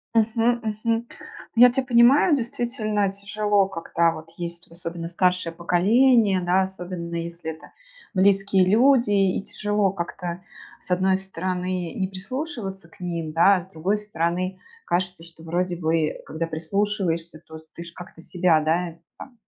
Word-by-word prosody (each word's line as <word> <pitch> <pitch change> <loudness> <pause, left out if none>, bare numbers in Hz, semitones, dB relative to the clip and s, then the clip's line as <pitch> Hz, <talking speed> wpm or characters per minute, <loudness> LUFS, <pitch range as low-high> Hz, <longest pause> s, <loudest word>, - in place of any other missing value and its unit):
Мгм. 230 +2 +2 0.2
Мгм. 230 0 0 0.5
Ну, 240 - +7
я 250 - +8
тя 265 - 0
понимаю, 255 +6 +5
действительно 225 -5 -1
тяжело, 205 0 0
когда 165 -2 0
вот 160 0 -9
есть, 170 0 -6
вот 165 - -18
особенно 170 -1 -5
старшее 180 -1 +1
поколение, 200 +4 +3
да, 180 +2 +2
особенно 180 -2 -5
если 170 -1 -4
это 160 - -13 0.4
близкие 195 -1 +3
люди, 245 +1 +4
и 195 -2 +2
тяжело 205 -2 0
как-то, 175 -1 -5 0.4
с 180 - -11
одной 190 +1 +3
стороны, 185 -1 -3
не 190 -1 -1
прислушиваться 195 - -6
к - - -22
ним, 170 -3 -4
да? 195 +4 +6
А 180 - -1
с 190 - -20
другой 190 +6 0
стороны 185 -2 -2 0.3
кажется, 180 -1 -2
что, 165 -1 -13
вроде 175 +1 -1
бы, 160 -2 0
когда 160 +2 -3
прислушиваешься, 170 -1 -2
то 160 0 -10
ты 170 - -8
ж 170 - -10
как-то 175 -2 -12
себя, 175 -2 +2
да, 165 +2 0 0.2
там 250 -3 -12
185 Hz, 150 wpm, -24 LUFS, 170-210 Hz, 0.5 s, я